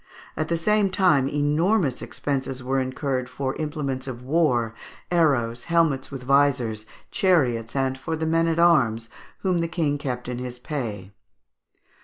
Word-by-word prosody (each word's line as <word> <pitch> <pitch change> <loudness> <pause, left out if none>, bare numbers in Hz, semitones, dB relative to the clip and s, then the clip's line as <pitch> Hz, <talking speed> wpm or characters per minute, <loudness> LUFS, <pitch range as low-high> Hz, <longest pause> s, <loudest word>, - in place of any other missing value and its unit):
At 155 - -2
the 170 - 0
same 210 +4 +2
time 175 -8 +3
enormous 150 - +1
expenses 130 +2 -3
were 135 +1 0
incurred 130 0 -2
for 135 -1 -3
implements 145 -4 -3
of 125 -2 -6
war, 130 -6 +1 0.4
arrows, 130 -9 +1
helmets 165 -6 +1
with 135 -3 -7
visors, 125 -5 +2 0.2
chariots, 125 - +1
and 135 -1 0
for 160 +5 -4
the 160 0 -2
men 165 +1 +2
at 165 0 0
arms 120 -10 +3 0.3
whom 185 -3 +1
the 165 - 0
King 155 -4 -1
kept 125 -4 -4
in 125 0 -4
his 125 -1 -6
pay. 115 - -5
140 Hz, 150 wpm, -24 LUFS, 125-165 Hz, 0.4 s, time